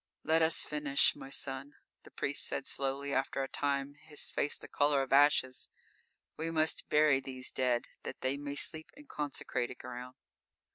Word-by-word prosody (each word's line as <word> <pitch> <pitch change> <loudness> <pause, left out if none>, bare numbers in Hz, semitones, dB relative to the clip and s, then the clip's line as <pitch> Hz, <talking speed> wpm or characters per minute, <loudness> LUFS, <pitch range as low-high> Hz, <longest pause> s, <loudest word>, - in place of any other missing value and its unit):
"Let 160 +1 +3
us 160 +1 +3
finish, 150 -2 +2
my 135 - -10
son," 135 +1 -4 0.3
the - - -15
priest - - -1
said - - -2
slowly, 140 +1 -1
after 135 0 0
a - - -3
time, 140 0 -1
his 150 +1 -5
face 145 - 0
the - - -11
color 145 -1 +2
of 135 - -3
ashes. 140 -2 +3 0.7
"We 160 +1 -2
must 160 -1 0
bury 150 -3 +4
these 130 -1 -5
dead, 125 -2 +1 0.2
that - - -7
they 130 +1 0
may 140 0 -5
sleep 160 +2 +4
in 295 - -13
consecrated 135 - -3
ground." 125 0 -8
140 Hz, 165 wpm, -32 LUFS, 135-150 Hz, 0.7 s, bury